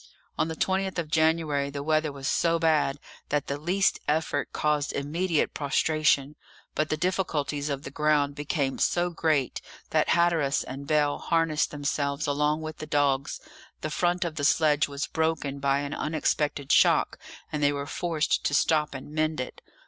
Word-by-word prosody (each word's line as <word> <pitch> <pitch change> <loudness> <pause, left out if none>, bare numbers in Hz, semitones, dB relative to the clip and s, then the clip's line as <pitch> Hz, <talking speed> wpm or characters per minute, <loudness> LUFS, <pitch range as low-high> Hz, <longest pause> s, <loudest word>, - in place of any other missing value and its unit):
On - - 0
the 160 - -4
20th 190 +2 -1
of 160 -3 -3
January 155 -3 +2
the 140 0 -5
weather 155 0 +1
was 135 -1 -6
so 170 0 +2
bad 155 -4 +2 0.3
that 150 0 0
the 140 +1 -4
least 185 +6 +1
effort 155 +2 0
caused 150 -1 0
immediate 160 +4 0
prostration; 150 0 +1 0.4
but 155 0 -1
the 155 - 0
difficulties 155 -5 -1
of 140 -1 -3
the 135 - -7
ground 150 -1 +2
became 145 -2 -2
so 175 0 +1
great 155 -5 0 0.3
that - - +2
Hatteras 165 -5 +2
and 135 +2 -8
Bell 150 -2 +2
harnessed 165 -2 +1
themselves 145 0 -2
along 150 +1 +1
with 155 -1 -6
the 155 - -6
dogs; 145 -2 +1 0.4
the 155 - -3
front 175 +2 +1
of 160 -2 -5
the 145 - -2
sledge 150 0 +3
was 140 0 -3
broken 160 -4 -1
by 140 0 +1
an 145 0 -4
unexpected 150 -2 -1
shock, - - +4 0.3
and 150 - -2
they 145 0 +4
were 140 0 -3
forced 160 +1 -1
to 145 - +1
stop 150 -1 +2
and 135 +2 -8
mend 155 0 0
it. 130 - -6
150 Hz, 170 wpm, -27 LUFS, 140-160 Hz, 0.4 s, shock